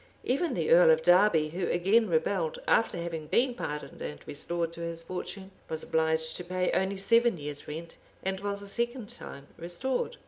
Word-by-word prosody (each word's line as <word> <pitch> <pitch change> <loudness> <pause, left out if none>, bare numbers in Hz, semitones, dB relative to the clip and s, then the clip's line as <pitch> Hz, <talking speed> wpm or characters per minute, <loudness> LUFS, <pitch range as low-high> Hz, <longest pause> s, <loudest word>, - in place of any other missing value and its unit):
Even 300 +7 0
the - - 0
earl - - +8
of 480 - +5
Derby, 175 -4 +5
who 175 +3 -2
again 200 +5 +3
rebelled, 165 0 0
after 225 - +3
having 165 -2 -4
been 245 +9 +2
pardoned 150 - -5
and 75 0 -5
restored 170 +3 -3
to 170 - -7
his 165 0 -4
fortune, 190 +2 -6 0.2
was 160 0 -3
obliged 160 0 +1
to 180 - -6
pay 180 +1 -1
only 190 +1 0
seven 230 +1 +3
years' 145 -1 -6
rent, 165 +2 -7 0.3
and 190 0 -1
was 200 0 -3
a - - -8
second 235 +1 -2
time 140 - -9
restored. 245 - -2
180 Hz, 180 wpm, -29 LUFS, 160-210 Hz, 0.3 s, earl